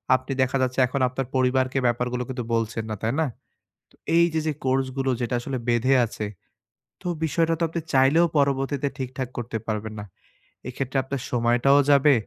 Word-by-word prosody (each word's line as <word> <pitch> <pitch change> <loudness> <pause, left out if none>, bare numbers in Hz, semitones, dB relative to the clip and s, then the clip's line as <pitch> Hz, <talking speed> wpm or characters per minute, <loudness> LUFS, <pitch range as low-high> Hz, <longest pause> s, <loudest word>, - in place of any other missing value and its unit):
আপনি 130 +2 -4
দেখা 130 +1 +1
যাচ্ছে 130 0 0
এখন 135 +2 -2
আপনার 130 +1 -3
পরিবারকে 130 0 +2
ব্যাপার 120 +1 +1
গুলো 125 0 -1
কিন্তু 125 -2 -3
বলছেন 115 0 -1
না, 110 - -2
তাই 115 +2 0
না? - - +2 0.7
তো - - -24 0.2
এই 170 0 +6
যে, 160 - +1
যে 155 - +1
কোর্স 130 0 +2
গুলো 135 -1 +1
যেটা 120 0 -1
আসলে 130 +2 -4
বেঁধে 120 +3 +3
আছে। 105 -1 -5 0.8
তো - - -6 0.2
বিষয়টা 165 +2 +1
তো - - 0
আপনি 165 +1 -3
চাইলেও 135 +6 +5
পরবর্তীতে 140 0 +1
ঠিকঠাক 130 -1 -4
করতে 120 -1 -3
পারবেন 110 0 -3
না। 105 - -6 0.6
এক্ষেত্রে 135 +1 -3
আপনার 135 0 -4
সময়টাও 120 +3 +3
যাবে। 140 +1 +6
130 Hz, 180 wpm, -24 LUFS, 120-140 Hz, 0.8 s, এই